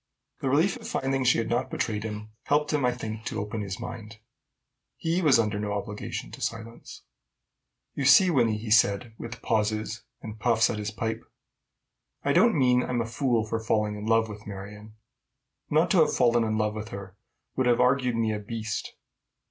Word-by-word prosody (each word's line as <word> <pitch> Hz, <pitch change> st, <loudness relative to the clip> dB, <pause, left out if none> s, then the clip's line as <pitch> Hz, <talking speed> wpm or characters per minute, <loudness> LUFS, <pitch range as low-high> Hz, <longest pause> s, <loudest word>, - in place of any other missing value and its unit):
The 135 Hz, -, -1 dB
relief 160 Hz, -, +2 dB
of 225 Hz, -2 st, -9 dB
finding 135 Hz, -, -1 dB
she 125 Hz, -, +4 dB
had 115 Hz, -, -1 dB
not 120 Hz, +2 st, -1 dB
betrayed 105 Hz, -2 st, -2 dB
him 105 Hz, 0 st, -6 dB
helped 150 Hz, +1 st, +1 dB
him, 145 Hz, -3 st, +1 dB
I 125 Hz, -, +3 dB
think, 110 Hz, -3 st, -6 dB
to 110 Hz, -, -3 dB
open 105 Hz, +2 st, -4 dB
his 100 Hz, -2 st, -5 dB
mind: 110 Hz, -2 st, -8 dB, 0.8 s
he 170 Hz, +2 st, 0 dB
was 150 Hz, -6 st, +5 dB
under 105 Hz, -2 st, 0 dB
no 105 Hz, -1 st, -2 dB
obligation 105 Hz, 0 st, -5 dB
to -, -, -10 dB
silence. 115 Hz, 0 st, -6 dB, 0.9 s
"You 140 Hz, -, -2 dB
see, 180 Hz, +6 st, +7 dB
Wynnie," 115 Hz, -7 st, +2 dB
he 110 Hz, 0 st, -6 dB
said, 110 Hz, +1 st, +3 dB
with 115 Hz, 0 st, -8 dB
pauses, 110 Hz, 0 st, -1 dB, 0.2 s
and 110 Hz, -1 st, -9 dB
puffs 115 Hz, -1 st, +3 dB
at 110 Hz, -, -4 dB
his 105 Hz, 0 st, -3 dB
pipe, 110 Hz, +1 st, -3 dB, 1.0 s
"I 140 Hz, -, +3 dB
don't 225 Hz, -1 st, +4 dB
mean 125 Hz, -2 st, +4 dB
I'm 125 Hz, -1 st, -1 dB
a -, -, -2 dB
fool 115 Hz, -1 st, 0 dB
for 115 Hz, +1 st, -2 dB
falling 105 Hz, -1 st, 0 dB
in 105 Hz, +1 st, -6 dB
love 115 Hz, 0 st, +3 dB
with 105 Hz, 0 st, -10 dB
Marion. 105 Hz, +2 st, -9 dB, 0.7 s
Not 160 Hz, +3 st, +3 dB
to 185 Hz, -, +5 dB
have 155 Hz, -, +4 dB
fallen 120 Hz, -2 st, +3 dB
in 110 Hz, -1 st, -1 dB
love 105 Hz, -1 st, 0 dB
with 110 Hz, 0 st, -6 dB
her 100 Hz, -2 st, -8 dB, 0.4 s
would 130 Hz, -1 st, +1 dB
have 120 Hz, -1 st, +3 dB
argued 125 Hz, -1 st, +3 dB
me 110 Hz, -1 st, +1 dB
a 105 Hz, -, -3 dB
beast. 110 Hz, +1 st, -5 dB
115 Hz, 190 wpm, -27 LUFS, 105-125 Hz, 1.0 s, see